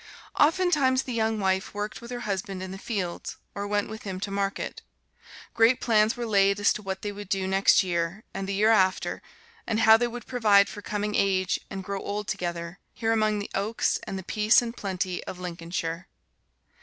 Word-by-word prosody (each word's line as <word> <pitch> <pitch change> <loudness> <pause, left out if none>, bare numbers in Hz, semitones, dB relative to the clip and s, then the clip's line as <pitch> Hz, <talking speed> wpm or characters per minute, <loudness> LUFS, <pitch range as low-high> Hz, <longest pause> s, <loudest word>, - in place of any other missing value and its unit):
Oftentimes 295 -5 +3
the 255 - -5
young 220 -1 0
wife 190 0 0
worked 205 +1 -4
with 235 - -10
her 245 -1 -5
husband 195 -2 -3
in 190 - -6
the 190 - -7
fields, 195 -6 -4 0.2
or 200 0 -4
went 205 0 0
with 220 0 -8
him 190 -2 -5
to 200 - -3
market. 195 0 -2 0.7
Great 230 +2 +4
plans 220 +1 +3
were 240 - -3
laid 200 -2 +3
as 205 - +4
to - - -6
what 190 -1 -5
they 205 - -2
would 205 -1 -9
do 190 -1 0
next 195 +1 +4
year, 175 +3 -2
and 195 - -4
the - - -1
year 215 +3 +4
after, 190 -4 +2 0.5
and 225 -1 0
how 220 0 +8
they 240 +1 +1
would 240 0 -7
provide 210 -5 +4
for 205 - -8
coming 210 0 -3
age 190 -2 +1
and 195 0 -5
grow 200 +1 -4
old 205 0 -4
together, 175 -2 -4 0.2
here 225 -1 0
among 215 -1 +2
the 205 - -5
oaks 210 +4 0
and 195 - -4
the 190 - -6
peace 215 +4 +4
and 240 -1 -4
plenty 185 -3 -3
of 185 - -6
Lincolnshire. 170 0 -4
205 Hz, 200 wpm, -27 LUFS, 190-220 Hz, 0.7 s, how